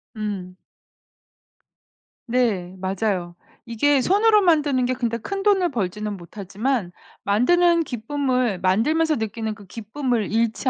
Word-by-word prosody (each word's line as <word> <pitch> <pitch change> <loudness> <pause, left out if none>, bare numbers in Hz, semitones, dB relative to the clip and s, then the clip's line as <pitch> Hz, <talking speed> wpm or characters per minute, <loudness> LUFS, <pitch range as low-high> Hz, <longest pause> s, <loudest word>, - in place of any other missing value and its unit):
음. 200 -4 -5 1.7
네. 215 -7 0
맞아요. 185 -2 -2 0.3
이게 265 +4 +2
손으로 420 - +4
만드는 295 -8 +2
게 255 - 0
근데 235 -2 -2
큰돈을 390 - +1
벌지는 210 -2 -3
못하지만 200 +4 -3 0.3
만드는 335 +11 +3
기쁨을 250 - -1
만들면서 300 +12 +2
느끼는 220 0 -3
그 205 -1 -14
기쁨을 230 +1 -3
잃지 230 +3 0
230 Hz, 255 characters per minute, -22 LUFS, 205-290 Hz, 1.7 s, 손으로